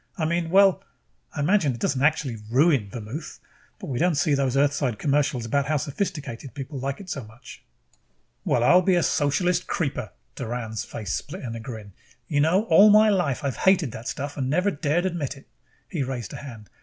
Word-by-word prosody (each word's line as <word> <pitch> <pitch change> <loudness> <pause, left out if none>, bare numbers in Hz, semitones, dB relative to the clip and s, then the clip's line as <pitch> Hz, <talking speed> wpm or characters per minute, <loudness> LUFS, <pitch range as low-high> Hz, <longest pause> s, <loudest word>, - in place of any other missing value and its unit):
I 160 - 0
mean 170 +1 -1
well, 195 +1 +5 0.5
I - - -2
imagine 155 - +2
it - - -10
doesn't 130 +2 0
absolutely 140 -6 +1
ruin 135 -4 +3
vermouth. 120 - -7 0.4
But - - -9
we 125 - -2
don't 175 0 +2
see 155 0 +2
those 135 -2 +1
Earthside 140 -4 +1
commercials 140 -3 0
about 140 +4 0
how 155 0 +1
sophisticated 145 - -4
people 135 0 -6
like 135 +1 -3
it 200 - -10
so 140 -7 -4
much." 110 +3 -13 0.8
"Well, 120 - +1
I'll 180 +8 +6
be 185 0 +2
a 175 - +2
socialist 175 +5 +1
creeper!" 140 - -2 0.2
Doran's 115 -3 -4
face 105 - -5
split - - -5
in 120 -3 -5
a - - -5
grin. 110 -4 -9 0.3
"You 145 +1 +1
know, 175 +7 +3
all 200 +1 +6
my 215 +1 +6
life 175 -11 0
I've 135 -3 -2
hated 185 -9 +3
the 110 - -7
stuff 140 +3 -5
and 130 -2 -1
never 180 +7 +2
dared 155 +3 0
admit 160 -6 -3
it!" 135 - -16 0.4
He 165 - -3
raised 125 -6 -4
a - - -6
hand. 115 -7 -10
140 Hz, 195 wpm, -25 LUFS, 125-170 Hz, 0.8 s, I'll